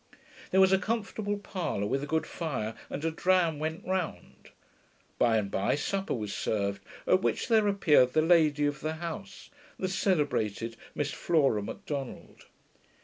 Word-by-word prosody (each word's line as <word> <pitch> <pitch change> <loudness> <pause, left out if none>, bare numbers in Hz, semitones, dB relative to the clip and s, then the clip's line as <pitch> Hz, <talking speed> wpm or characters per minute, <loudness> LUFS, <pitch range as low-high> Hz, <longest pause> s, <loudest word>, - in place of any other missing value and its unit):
There 190 - +3
was 190 0 +6
a 190 - +5
comfortable 210 -1 -2
parlour 180 - -3
with 135 +6 0
a 145 - -4
good 160 +1 0
fire, 130 -10 -3 0.2
and 150 - -4
a 165 - +1
dram 170 -2 +2
went 160 +2 -3
round. 185 -2 -4 0.7
By 115 -2 +4
and 100 -2 -2
by 95 - +1
supper 195 +5 -2
was 105 -4 -4
served, 100 -1 -1 0.2
at 185 - +4
which - - 0
there 220 -2 +4
appeared 150 -10 +4
the 155 - +4
lady 155 -3 +4
of 145 0 -1
the 155 +1 -2
house, 175 - -7 0.3
the 185 - -1
celebrated 145 - 0 0.2
Miss 145 -1 -1
Flora 140 -11 +2
Macdonald. 135 +5 -6
160 Hz, 155 wpm, -29 LUFS, 130-185 Hz, 0.7 s, was